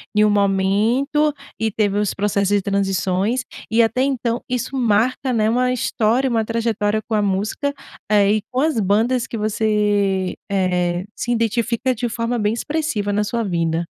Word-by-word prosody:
em 210 - +5
um 210 - +4
momento 210 +9 +2 0.3
e 225 - +1
teve 205 -1 0
os 210 - 0
processos 200 0 +1
de 200 - +2
transições 195 +4 0 0.3
e, 225 +2 +4
até 250 +3 +1
então, 245 -3 -1
isso 250 +1 -2
marca, 250 +3 +1
né, 220 -2 +2
uma 250 +2 +1
história, 240 +2 +1
uma 225 -2 0
trajetória 220 -2 0
com 225 - -5
a 210 - +2
música, 205 +8 -1 0.4
eh, 205 0 +4
e 215 - 0
com 255 - +1
as 310 -6 +1
bandas 225 +5 +1
que 230 - -5
você, 205 -3 0
eh, 180 -2 0
se - - -5
identifica 235 +2 0
de 240 0 -2
forma 235 +1 -2
bem 210 0 +1
expressiva 240 -6 -2
na 210 +1 0
sua 230 +2 -2
vida. 170 -4 -1
215 Hz, 165 wpm, -20 LUFS, 200-240 Hz, 0.4 s, em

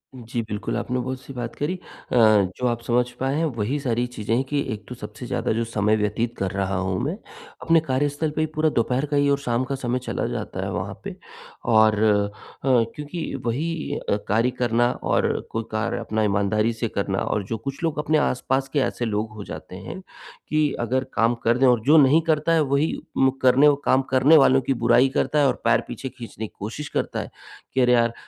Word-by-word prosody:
जी 120 -1 -4
बिल्कुल, 110 0 -4
आपने 125 0 -2
बहुत 130 +1 -4
सही 135 - -10
बात 120 -1 -5
करी। 150 +5 -2
अ, 180 - -12 0.3
जो 110 0 +4
आप 120 -1 -1
समझ 120 +1 +1
पाए 135 +2 0
हैं, 165 +1 +1
वही 125 +8 -1
सारी 120 -3 0
चीज़ें 110 0 -2
हैं 130 - +1
कि 145 -1 0
एक 105 0 -9
तो 125 - -6
सबसे 110 +2 -9
ज़्यादा - - -1
जो 115 +1 0
समय 110 -1 +1
व्यतीत 115 +3 -1
कर 95 -1 -2
रहा 95 0 -1
हूँ 95 +1 -1
मैं, 160 +8 -2 0.4
अपने 165 0 +4
कार्यस्थल 145 +4 0
पे 155 - 0
ही 155 - +1
पूरा 155 0 +3
दोपहर 125 +2 0
का 145 - +2
ही 145 0 +3
और 140 - +3
शाम 120 -2 -1
का 135 +1 -3
समय 125 -1 -2
चला - - -2
जाता - - -4
है - - -3
वहाँ - - -3
पे - - -6 0.5
और 110 -1 +4
अ, 105 -1 +3 0.4
क्योंकि 140 +6 0
वही 155 +7 -2 0.2
अ, - - +3
कार्य 115 +4 +2
करना 120 0 +2
और - - +2 0.2
कोई 115 0 -2
कार्य 110 +2 -1
अपना 110 -1 -1
ईमानदारी 105 +2 +1
से 115 +1 -2
करना 100 -1 -1
और 105 - -1
जो 115 - -2
कुछ 140 +7 -6
लोग 155 -2 0
अपने 155 +1 +2
आस-पास 135 -1 0
के 145 - +2
ऐसे 120 -2 -1
लोग 110 0 -1
हो 105 - -7
जाते 80 +2 -9
हैं 95 - -7 0.5
कि 155 -1 +2
अगर 130 +3 0
काम 115 +2 +2
कर 115 +2 +3
दें 130 0 +4
और 120 -2 +4
जो 155 +3 +6
नहीं 150 +2 +6
करता 160 0 +1
है, 160 - +4
वही 140 +2 +1 0.2
मुकरने 135 +1 +4
ओ 145 - +5
काम 130 +1 +4
करने 135 +5 +6
वालों 135 -1 +5
की 135 - 0
बुराई 120 +2 +4
करता 150 +2 0
है 140 - +5
और 125 - -1
पैर - - +4
पीछे 130 - -6
खींचने 115 -3 -8
की - - -24
कोशिश 115 +8 -5
करता - - -2
है - - -8 0.4
कि, 130 - +2
"अरे! 125 0 +4
यार, 115 -1 +3
125 Hz, 220 wpm, -23 LUFS, 110-140 Hz, 0.5 s, जो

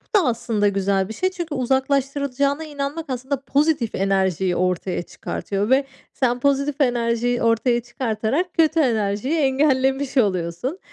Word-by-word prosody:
Bu - - +7
da 340 - +1
aslında 230 -3 0
güzel 195 -1 +1
bir - - -5
şey, 370 - 0
çünkü 340 -5 -5
uzaklaştırılacağına 275 +2 0
inanmak 295 +1 -4
aslında 260 +2 -3
pozitif 285 -4 +1
enerjiyi 190 -2 +1
ortaya 180 0 -1
çıkartıyor 200 +4 -4
ve 270 +1 +4 0.3
sen 245 -2 0
pozitif 280 +1 +1
enerjiyi 240 -1 +1
ortaya 235 +1 +2
çıkartarak 240 - -2
kötü 325 -1 +3
enerjiyi 225 +2 +1
engellemiş 270 -1 +1
oluyorsun. 195 - 0
255 Hz, 130 wpm, -22 LUFS, 215-280 Hz, 0.3 s, Bu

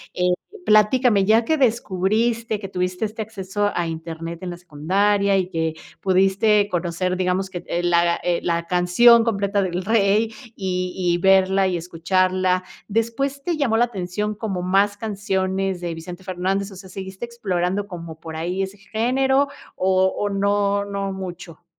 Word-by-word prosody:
eh, 180 0 +2 0.3
platícame, 215 - +4
ya 220 +3 +4
que 315 +7 +1
descubriste 225 -1 +1
que 195 - -6
tuviste 180 +2 -2
este 220 +1 -4
acceso 205 -1 -2
a 175 -1 -1
Internet 165 +1 -6
en 180 - -4
la 175 - -7
secundaria 195 +5 +1
y 185 -1 0
que 160 -2 -1 0.3
pudiste 195 +2 +3
conocer 180 0 -1
digamos 185 +1 0
que, 175 -2 -6
eh, 175 - -1
la, 170 -1 +2
eh, 175 -1 0
la 170 -1 -1
canción 185 +7 +5
completa 200 -2 0
de 185 - -1
El 180 +2 -3
Rey 215 +1 +2 0.2
y 185 -2 -2
y 175 -2 +1
verla 190 +1 +4
y 180 - 0
escucharla, 185 +2 +1 0.2
¿después 230 +6 -1
te 340 -1 -1
llamó 265 -7 +1
la 240 +2 +4
atención 210 0 -3
como 200 -4 -3
más 200 +3 +2
canciones 195 -3 -2
de 170 -1 -3
Vicente 175 +3 -9
Fernández, 190 +2 -2
o - - -11
sea 190 0 -11
seguiste 190 +3 -6
explorando 200 -4 -2
como 165 -4 -8
por 160 -1 -8
ahí 180 +4 -2
ese 195 +1 -4
género 265 +7 +1 0.3
o 190 0 +2
o 205 - -1
no, 200 0 +1
no 200 -1 -3
mucho? 180 -3 -8
190 Hz, 165 wpm, -22 LUFS, 180-210 Hz, 0.3 s, canción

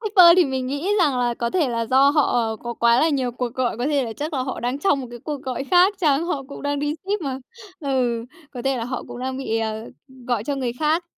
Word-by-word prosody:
Shipper 365 -5 +7
thì 365 - +6
mình 265 -2 -2
nghĩ 285 +8 -3
rằng 290 -8 +2
là 240 -1 +1
có 235 0 -2
thể 330 -7 +1
là 230 -1 -2
do 265 +4 +5
họ 240 -7 +1
có 240 +2 -6
quá 235 +1 +4
là 320 - +4
nhiều 265 -5 0
cuộc 245 0 -4
gọi, 255 -3 -1
có 245 - -1
thể 285 -3 +1
là 225 - -5
chắc 305 +3 -4
là 260 - 0
họ 260 - -4
đang 250 +3 -2
trong 295 -5 +2
một 255 - -6
cái 240 - -8
cuộc 295 -3 -4
gọi 260 +1 -3
khác 365 +6 +4
chăng, 305 -2 +2
họ 295 -6 -2
cũng 280 - -9
đang 285 0 -1
đi 295 +1 -1
ship 400 +1 -2
mà, 270 -4 -3 0.4
ừ, 250 -5 0 0.3
có 245 - -5
thể 270 -1 0
là 230 - -3
họ 255 0 -4
cũng - - -8
đang 260 +1 -3
bị, 225 -4 -2
à, 220 0 -3 0.4
gọi 240 -4 0
cho 285 +3 -1
người 255 -3 -2
khác. 315 +3 +1
265 Hz, 270 wpm, -22 LUFS, 245-295 Hz, 0.4 s, Shipper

